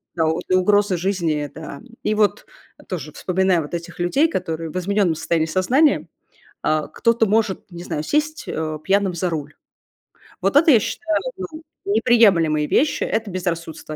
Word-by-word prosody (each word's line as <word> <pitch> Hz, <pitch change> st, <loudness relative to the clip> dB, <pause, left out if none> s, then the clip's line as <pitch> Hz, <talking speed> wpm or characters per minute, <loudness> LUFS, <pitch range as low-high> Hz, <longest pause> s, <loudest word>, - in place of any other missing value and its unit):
да, 165 Hz, -2 st, +1 dB
вот 160 Hz, +1 st, 0 dB
и 185 Hz, -, +4 dB
угроза 200 Hz, +1 st, +3 dB
жизни, 165 Hz, -6 st, -1 dB
да. 155 Hz, -3 st, -8 dB, 0.2 s
И 215 Hz, -, +1 dB
вот 210 Hz, -1 st, +1 dB, 0.4 s
тоже 155 Hz, -5 st, -5 dB
вспоминая 185 Hz, -2 st, +1 dB
вот 150 Hz, -, -9 dB
этих 170 Hz, +1 st, -6 dB
людей, 270 Hz, -, +3 dB
которые 165 Hz, -, -3 dB
в 155 Hz, -, -5 dB
изменённом 190 Hz, -2 st, +1 dB
состоянии 160 Hz, 0 st, 0 dB
сознания, 245 Hz, -, +2 dB, 0.6 s
а, 155 Hz, -1 st, 0 dB
кто-то 230 Hz, +7 st, +2 dB
может, 210 Hz, -1 st, 0 dB
не 175 Hz, -1 st, -8 dB
знаю, 150 Hz, -, -3 dB
сесть, 300 Hz, -, -1 dB
э, 155 Hz, -1 st, -3 dB
пьяным 195 Hz, -1 st, +2 dB
за 175 Hz, +1 st, -1 dB
руль. 150 Hz, -2 st, -5 dB, 0.9 s
Вот 195 Hz, +6 st, 0 dB
это, 320 Hz, +1 st, +6 dB
я 235 Hz, -, +7 dB
считаю, 320 Hz, +9 st, -2 dB, 0.2 s
ну, 330 Hz, -4 st, -7 dB, 0.2 s
неприемлемые 200 Hz, -9 st, +3 dB
вещи. 295 Hz, -, +2 dB
Это 220 Hz, -3 st, -2 dB
безрассудство, 170 Hz, -4 st, -4 dB
185 Hz, 160 wpm, -21 LUFS, 160-215 Hz, 0.9 s, я